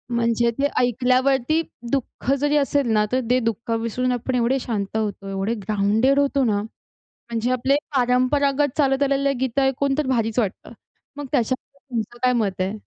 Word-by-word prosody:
म्हणजे 235 0 +2
ते 285 +1 +2
ऐकल्यावरती 255 +4 +2 0.3
दुःख 270 -1 -2
जरी 290 +1 +2
असेल 280 -2 +1
ना, 210 0 +3
तर 255 +1 +1
ते 250 +1 +4
दुःख 230 +1 -3
विसरून 250 +3 -1
आपण 250 +1 -2
एवढे 250 +3 +1
शांत 210 -4 -4
होतो, 205 -2 -3
एवढे 195 +4 -1
ग्राउंडेड 215 +6 +2
होतो 280 -1 +2
ना. 205 -2 +1 0.5
म्हणजे 235 +1 -4
आपले 265 +3 +2 0.2
परंपरागत 265 +3 +2
चालत 270 -1 +2
आलेले 275 0 +2
गीतं 265 +1 0
ऐकून 270 +1 +1
तर 300 - 0
भारीच 230 -2 0
वाटतं. 205 -5 -2 0.4
मग 290 -1 -5
त्याच्याबद्दल 260 +2 -3
तुमचं 235 +1 -3
काय 250 0 +4
मत 195 -2 -3
आहे? 190 +3 -1
250 Hz, 165 wpm, -22 LUFS, 230-275 Hz, 0.5 s, ते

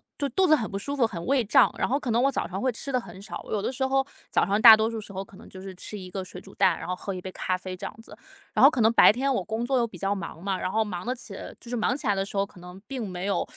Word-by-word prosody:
就 280 -1 -2
肚 380 -1 +2
子 310 - +7
很 220 -6 -3
不 195 - -4
舒 285 +6 -4
服， 250 -4 +3
很 170 -6 -7
胃 270 -2 +2
胀。 250 +4 +4
然 - - 0
后 275 +3 +1
可 245 - -3
能 235 +2 +3
我 275 +1 +3
早 - - -2
上 190 +1 -5
会 255 -1 +1
吃 275 +4 -6
的 255 -2 +1
很 190 - -12
少， 200 - -7
我 - - -11
有 210 - 0
的 - - -2
时 265 +1 -1
候 270 0 +1 0.2
早 - - +2
上 205 +3 +1
大 220 -1 +11
多 220 +1 +1
数 225 -1 -5
时 205 - -11
候 195 0 -5
可 195 - -17
能 - - -14
就 185 - -11
是 190 0 -8
吃 210 +3 -8
一 185 -1 -9
个 190 0 -4
水 180 0 -10
煮 - - -15
蛋， 190 -4 +3
然 - - -7
后 180 - -2
喝 195 +1 -5
一 185 - -5
杯 185 +1 -7
咖 185 0 -2
啡 185 0 -7
这 180 - -7
样 - - -6
子。 - - -12 0.4
然 - - +3
后 275 - +10
可 260 - -3
能 220 +2 +4
白 - - +8
天 270 +4 0
我 195 - -1
工 220 +5 -3
作 260 -1 +1
又 235 - +1
比 195 - -12
较 195 +3 0
忙 170 -3 -7
嘛， 190 0 -1
然 185 - -3
后 220 0 +2
忙 180 -1 -6
得 250 - 0
起 220 -4 -10 0.3
就 - - -17
是 245 - -2
忙 245 +3 0
起 290 - -9
来 205 - +4
的 195 - 0
时 200 - -7
候， 195 - +2
可 190 - -17
能 180 +1 -11
并 255 -5 -4
没 180 +1 -5
有 200 - 0
215 Hz, 380 characters per minute, -26 LUFS, 190-250 Hz, 0.4 s, 大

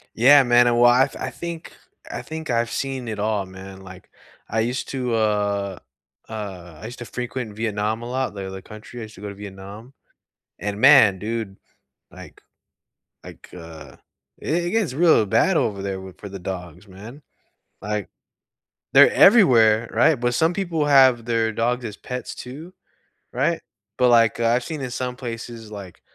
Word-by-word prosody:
Yeah, 135 +5 +7
man, 120 -1 +4
and 120 0 +2
well, 120 0 +7
I 130 +2 +4
I - - -3
think 170 -1 -7 0.4
I - - -5
think 160 -2 -6
I've 115 0 0
seen 135 -3 -4
it 110 -2 -4
all, 105 -1 -1
man, 95 +1 -11
like, 95 -1 -13 0.4
I 110 - -2
used 120 +3 -2
to, 125 -3 -2
uh 100 -3 -1 0.5
uh, 95 -7 -8
I - - -9
used 120 +3 -9
to 120 - -7
frequent 125 -3 -5
Vietnam 110 0 -2
a 120 - -7
lot 130 -1 -2
the 100 -1 -6
other 95 0 -8
country, 110 +4 -11
I - - -6
used 110 0 -11
to 95 - -14
go 105 - -6
to 100 - -9
Vietnam. 100 +4 -11 0.7
And 105 0 -4
man, 130 -8 +7
dude, 110 -1 -4 0.5
like - - -14 0.8
like, - - -13
uh, 80 -2 -11 0.4
it 170 +3 -1
it - - -1
gets 215 - 0
real 160 -5 +4
bad 180 - +2
over 105 -9 0
there 95 -1 -4
with 95 -1 -12
for 100 - -8
the 100 0 -8
dogs, 90 +1 -7
man. 110 +9 -12 0.6
Like 105 -1 -3 0.9
they're - - +8
everywhere, 115 - +5
right? 120 +8 +4
But 120 0 0
some 160 +7 +2
people 170 -5 -1
have 130 -4 +5
their 115 -1 0
dogs 120 +2 -1
as 105 -2 -7
pets, 125 0 -6
too, 150 +9 -10 0.6
right? 155 +7 0 0.4
But, 125 - +3
like, 115 -1 +4
uh, 115 - +1
I've 120 +1 +2
seen 155 +1 -6
in 130 - -4
some 125 0 -4
places, 115 -2 -7
like, 100 -4 -10
115 Hz, 175 wpm, -22 LUFS, 100-130 Hz, 0.9 s, they're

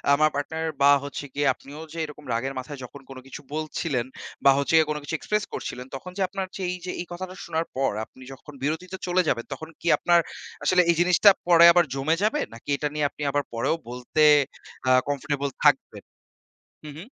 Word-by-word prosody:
আমার 155 +1 +4
পার্টনার 160 +3 -2
বা, 140 +1 +7
হচ্ছে 145 +1 -6
গিয়ে 145 0 0
আপনিও 145 +5 -11
যে - - -9
এরকম 150 0 -12
রাগের 135 +4 -2
মাথায় 135 +2 -8
যখন 135 +3 -10
কোন 135 - -9
কিছু 135 - -9
বলছিলেন 155 -4 -2 0.4
বা, 140 - +9
হচ্ছে 140 +3 0
গিয়ে 160 -1 +4
কোন 150 - -1
কিছু 160 - -3
এক্সপ্রেস 210 +5 -1
করছিলেন, 125 +1 -5
তখন 180 +7 -8
যে - - -2
আপনার 195 0 -4
যে - - -6
এইযে 180 0 -6
এই - - -5
কথাটা 185 +1 -6
শোনার 165 0 -1
পর 135 +1 +1
আপনি 130 - -16
যখন 145 +2 -13
বিরতিতে 175 +6 -3
চলে 180 +1 +3
যাবেন, 115 -4 0
তখন 160 +4 -8
কি - - -6
আপনার 175 -1 +4 0.4
আসলে 185 -1 +4
এই 170 - +5
জিনিসটা 180 +3 +6 0.2
পরে 170 -1 +8
আবার 175 -1 +4
জমে 140 +4 +1
যাবে? 220 +8 +2
নাকি 115 +5 -12
এটা 150 - -1
নিয়ে 150 -1 0
আপনি - - -14
আবার 145 +1 0
পরেও 115 +7 0
বলতে 125 +5 0 0.7
আ - - +5 0.2
কমফোর্টেবল 140 0 -2 0.2
থাকবেন? - - +2 0.8
হু, - - -7
হু। 165 - -8
150 Hz, 200 wpm, -25 LUFS, 140-175 Hz, 0.8 s, বা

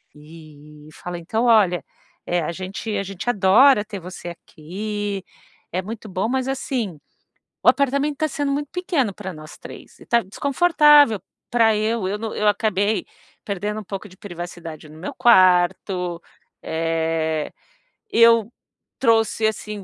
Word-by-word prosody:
E 150 -1 -15
fala: 175 0 -7
"Então, 220 +8 -1
olha, 205 -7 +4 0.4
eh, 175 0 0
a 155 - -2
gente 190 +5 -5
a - - -1
gente 195 +3 -5
adora 210 +3 +5
ter 205 -2 -7
você 175 0 -8
aqui, 200 +5 -5 0.5
é 185 +2 -1
muito 220 0 -8
bom, 185 +3 -1
mas 260 +1 -1
assim, 245 - -3 0.6
o - - +3
apartamento 280 +1 +2
tá 310 - +1
sendo 285 0 -2
muito 290 0 -2
pequeno 315 - -1
pra 190 -2 -7
nós 155 -1 -11
três, - - -12
e - - -15
tá 235 -1 +3
desconfortável 290 - +4 0.3
pra 225 -2 +4
eu 215 -2 -1
eu 205 +2 -2
no 220 0 -5
eu 210 - +1
acabei 205 0 +1 0.4
perdendo 205 +1 -3
um - - -11
pouco 195 +2 -7
de 185 - -17
privacidade 175 -4 -8
no 155 +1 -14
meu 195 - -6
quarto, 180 -4 +3 0.4
eh, 160 -1 -1 0.6
eu 230 - +5 0.5
trouxe 225 -3 +2
assim, 210 -2 -5
205 Hz, 145 wpm, -22 LUFS, 175-230 Hz, 0.6 s, adora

